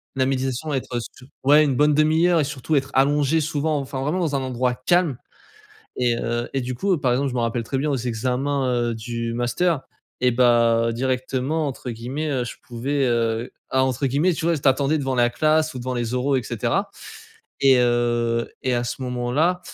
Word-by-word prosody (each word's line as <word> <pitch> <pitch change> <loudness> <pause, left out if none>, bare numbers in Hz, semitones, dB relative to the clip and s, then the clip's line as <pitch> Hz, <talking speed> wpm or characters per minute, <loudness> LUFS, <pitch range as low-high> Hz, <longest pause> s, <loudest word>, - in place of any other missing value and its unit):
la 130 -1 +2
méditation 135 +2 -2
être 125 -2 -2
su 125 +2 -10 0.2
ouais 145 +3 +6
une 140 -3 +1
bonne 150 +3 +4
1/2 155 +3 +3
heure 175 -2 +3
et - - +1
surtout 145 +1 -2
être 135 -1 0
allongé 145 +3 +3
souvent 155 0 -1
enfin 135 -1 -4
vraiment 155 +7 -1
dans 155 -5 0
un 135 - 0
endroit 125 -1 -1
calme 175 -8 +2 0.8
et 120 -1 +1
heu 120 +1 -2
et 135 - 0
du 125 +1 -4
coup, 195 +10 0
heu, 170 - 0
par 130 -3 +1
exemple 135 +3 +1
je 125 - -6
me - - 0
rappelle 115 +1 -1
très 135 +4 -3
bien 145 +3 0
aux - - +1
examens, 130 +3 -1 0.2
heu, - - -4
du 115 +1 -4
master 125 +7 0 0.4
et 125 0 +4
bah, 115 -1 +3
«directement» 130 +4 -1
entre 130 -2 -5
guillemets, 130 +7 -4
heu, 130 -4 0
je - - -7
pouvais, 135 +4 -1
heu 115 0 0 0.2
ah 130 0 +2
«entre 130 +1 -1
guillemets», 145 +8 +2
tu 160 - -4
vois, 170 -1 +2
tu 140 -1 -1
attendais 140 +3 +3
devant 135 -3 -2
la 120 -1 +3
classe 155 +3 +1
ou 130 - -6
devant 130 +1 -3
les 120 0 -2
oraux 135 +2 +1
et 130 - 0
cetera - - -1 0.7
et 135 -2 +5
heu, 120 -1 +1
et 130 -1 0
à 120 - 0
ce 120 - -5
moment-là, 125 +8 0
130 Hz, 210 wpm, -22 LUFS, 120-145 Hz, 0.8 s, ouais